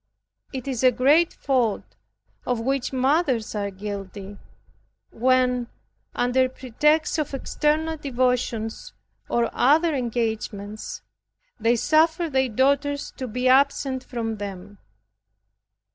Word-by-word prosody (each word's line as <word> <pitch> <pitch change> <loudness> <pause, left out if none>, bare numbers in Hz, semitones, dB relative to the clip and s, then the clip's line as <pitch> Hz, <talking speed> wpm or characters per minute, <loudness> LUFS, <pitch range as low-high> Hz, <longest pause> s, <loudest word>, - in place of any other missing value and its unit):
It 260 -1 -6
is 260 -2 -2
a 255 - +7
great 290 +8 +4
fault, 250 -6 -1 0.5
of 245 -2 -1
which 265 +2 -1
mothers 260 -3 +1
are 205 -1 -2
guilty, 200 0 -7 0.7
when 250 0 +2 0.5
under 255 +1 +2
pretext 300 +6 +1
of 290 -2 -2
external 310 +4 0
devotions, 250 -5 -1 0.4
or 235 -1 +1
other 315 +5 +3
engagements, 220 -4 -3 0.6
they 230 +2 +3
suffer 320 +6 +2
their 265 -1 +2
daughters 280 +4 +1
to 260 - -4
be 250 +3 -1
absent 265 0 +3
from 225 -4 -4
them. 200 0 -8
255 Hz, 105 wpm, -24 LUFS, 225-280 Hz, 0.7 s, a